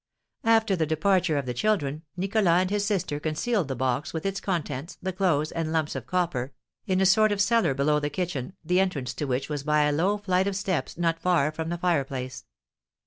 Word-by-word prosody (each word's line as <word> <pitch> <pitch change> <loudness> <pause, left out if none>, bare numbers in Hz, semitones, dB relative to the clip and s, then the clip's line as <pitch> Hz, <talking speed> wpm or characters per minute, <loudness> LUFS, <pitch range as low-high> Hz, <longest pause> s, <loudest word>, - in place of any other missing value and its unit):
After 225 -3 +4
the 160 -3 0
departure 165 +1 +2
of 140 - -1
the 125 - -3
children, 155 - 0 0.2
Nicholas 195 +2 +1
and 185 - -1
his 205 -1 +1
sister 190 -8 -1
concealed 165 - -1
the 135 - -3
box, 130 +3 -1
with 160 +1 -4
its 195 0 -2
contents, 165 -4 -3
the 190 0 -3
clothes, 170 -5 +1
and 165 -1 -2
lumps 160 -2 0
of 130 -3 -6
copper, 165 -8 -1 0.3
in 185 -1 +1
a - - +4
sort 215 +3 +5
of 205 - -1
cellar 205 - +3
below 150 +2 +2
the 145 0 -2
kitchen, 165 -2 -3
the 180 +3 +2
entrance 150 -10 -1
to 150 - -3
which 130 0 -1
was 150 -2 -3
by 150 +1 +2
a 150 - +2
low 180 +8 +1
flight 190 -2 +1
of 200 - -1
steps 185 -9 -2
not 165 -1 0
far 165 -5 +2
from 160 +1 -4
the 175 - -2
fireplace. 135 -7 -2
165 Hz, 210 wpm, -26 LUFS, 145-190 Hz, 0.3 s, sort